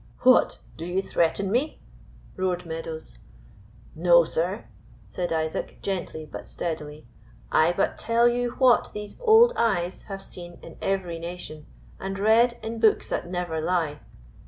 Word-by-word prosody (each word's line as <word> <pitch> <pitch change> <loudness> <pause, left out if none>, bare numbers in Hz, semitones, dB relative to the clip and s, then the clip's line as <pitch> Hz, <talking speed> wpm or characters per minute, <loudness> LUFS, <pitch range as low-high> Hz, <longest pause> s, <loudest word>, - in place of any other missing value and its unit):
"What, 255 0 +5 0.2
do 160 - -6
you 180 +3 -1
threaten 190 +3 0
me?" 265 +7 0 0.6
roared 180 -1 -1
Meadows. 160 - -7 0.7
"No, 170 +1 +5
sir," 175 +6 -2 0.4
said 180 -1 -4
Isaac, 160 -1 -2
gently 175 -5 -3
but 150 - -9
steadily. 155 -4 -5 0.5
"I 160 +2 +4
but 185 +2 -1
tell 230 +1 +3
you 240 0 0
what 255 -2 +4
these 210 0 -7
old 475 0 +6
eyes 185 -6 0
have 195 -1 -6
seen 175 -2 -11
in - - -11
every 180 -4 -1
nation, 170 -3 -8 0.3
and 195 0 -4
read 230 +4 +4
in 225 +1 -4
books 220 -2 +3
that - - -3
never 175 -3 -2
lie. 160 -3 0
180 Hz, 140 wpm, -25 LUFS, 165-220 Hz, 0.7 s, old